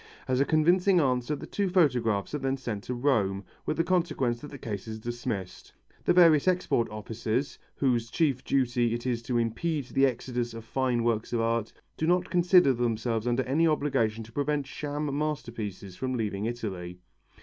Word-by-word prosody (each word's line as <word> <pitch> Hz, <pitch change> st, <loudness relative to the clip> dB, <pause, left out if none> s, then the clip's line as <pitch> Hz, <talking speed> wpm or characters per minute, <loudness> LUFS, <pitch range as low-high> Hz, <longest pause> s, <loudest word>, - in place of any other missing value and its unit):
As 130 Hz, 0 st, +1 dB
a 140 Hz, -, +4 dB
convincing 175 Hz, +5 st, +4 dB
answer 130 Hz, -1 st, +1 dB
the -, -, -8 dB
two 200 Hz, -2 st, -1 dB
photographs 125 Hz, -, +2 dB
are 150 Hz, -, -1 dB
then 135 Hz, 0 st, -1 dB
sent 110 Hz, -6 st, -5 dB
to 125 Hz, -, -3 dB
Rome, 105 Hz, -7 st, +1 dB, 0.2 s
with -, -, -1 dB
the 165 Hz, -, +3 dB
consequence 165 Hz, -9 st, 0 dB
that 145 Hz, -, -8 dB
the 140 Hz, -, -9 dB
case 105 Hz, -5 st, -5 dB
is 110 Hz, 0 st, -5 dB
dismissed. 115 Hz, -4 st, -5 dB, 0.3 s
The -, -, +4 dB
various 165 Hz, -3 st, +6 dB
export 180 Hz, -10 st, +2 dB
offices, 110 Hz, +5 st, -3 dB, 0.2 s
whose 120 Hz, -4 st, +1 dB
chief 135 Hz, -1 st, +1 dB
duty 120 Hz, -3 st, +1 dB
it 120 Hz, -, -6 dB
is 120 Hz, -2 st, -1 dB
to 120 Hz, +1 st, -1 dB
impede 135 Hz, +6 st, -1 dB
the 135 Hz, 0 st, +4 dB
exodus 120 Hz, -1 st, -3 dB
of 115 Hz, -1 st, -8 dB
fine 125 Hz, -1 st, 0 dB
works 115 Hz, 0 st, 0 dB
of 115 Hz, -, +1 dB
art, 115 Hz, -1 st, 0 dB, 0.3 s
do 160 Hz, -, -1 dB
not 180 Hz, 0 st, +2 dB
consider 175 Hz, -4 st, +5 dB
themselves 115 Hz, -1 st, -1 dB
under 120 Hz, +2 st, +1 dB
any 155 Hz, +6 st, +2 dB
obligation 135 Hz, -8 st, +1 dB
to 110 Hz, -, -14 dB
prevent 145 Hz, +2 st, -1 dB
sham 145 Hz, 0 st, -4 dB
masterpieces 115 Hz, -11 st, -4 dB
from 130 Hz, +3 st, -2 dB
leaving 105 Hz, -3 st, -2 dB
Italy. 95 Hz, -7 st, -5 dB
125 Hz, 180 wpm, -28 LUFS, 115-150 Hz, 0.3 s, various